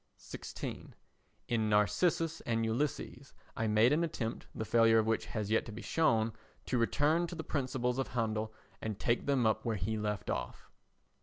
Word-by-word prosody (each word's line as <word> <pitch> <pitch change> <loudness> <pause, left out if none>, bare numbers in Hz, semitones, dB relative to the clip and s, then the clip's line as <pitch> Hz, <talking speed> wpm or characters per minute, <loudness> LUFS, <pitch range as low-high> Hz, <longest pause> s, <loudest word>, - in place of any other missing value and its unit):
16. - - -7 0.5
In 110 -2 +1
Narcissus 160 - +2
and 115 -1 +1
Ulysses 135 +2 -2 0.2
I 110 - 0
made 110 +5 +5
an 165 +3 +2
attempt, 115 -8 -3
the 110 - -3
failure 115 0 +5
of 110 - +3
which 115 0 0
has 105 -2 -3
yet 110 - +3
to - - -6
be 115 +2 -8
shown, 115 -9 +2 0.3
to 125 - 0
return 150 +8 +2
to 175 - -7
the 160 - -5
principles 130 -4 -1
of 135 - 0
Handel 110 0 -1 0.3
and 110 -3 -3
take 120 +3 0
them 135 -4 +3
up 110 -1 +2
where 115 -2 0
he 105 +3 -2
left 105 -3 -2
off. - - -5
115 Hz, 175 wpm, -33 LUFS, 110-135 Hz, 0.5 s, made